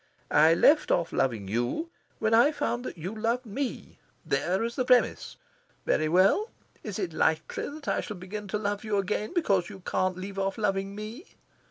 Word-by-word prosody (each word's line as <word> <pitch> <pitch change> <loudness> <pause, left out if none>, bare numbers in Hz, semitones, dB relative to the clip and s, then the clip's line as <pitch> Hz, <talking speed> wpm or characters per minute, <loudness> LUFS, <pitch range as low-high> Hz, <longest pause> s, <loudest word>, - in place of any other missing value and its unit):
I 155 +2 +6
left 300 - +5
off 170 -1 +1
loving 115 -7 0
you 120 - -2 0.3
when 220 +1 0
I 240 +6 +6
found 245 -5 -2
that - - -6
you 180 +6 -5
loved 230 +3 -1
me. 245 +5 -5 0.3
There 190 +4 0
is 235 +1 -3
the 255 - +1
premiss. 250 -1 +2 0.5
Very 155 0 +1
well! 195 - +4 0.3
Is 210 -3 -5
it 185 -6 -3
likely 160 0 0
that 290 0 -10
I - - +1
shall 210 - -7
begin 200 +3 -7
to 210 - -1
love 205 0 -2
you 215 -2 0
again 210 +2 -1
because 195 - +2
you 195 -2 -10
can't 185 0 -1
leave 195 +1 -6
off 195 0 -1
loving 195 -2 -1
me?" 220 - -9
205 Hz, 185 wpm, -28 LUFS, 185-230 Hz, 0.5 s, I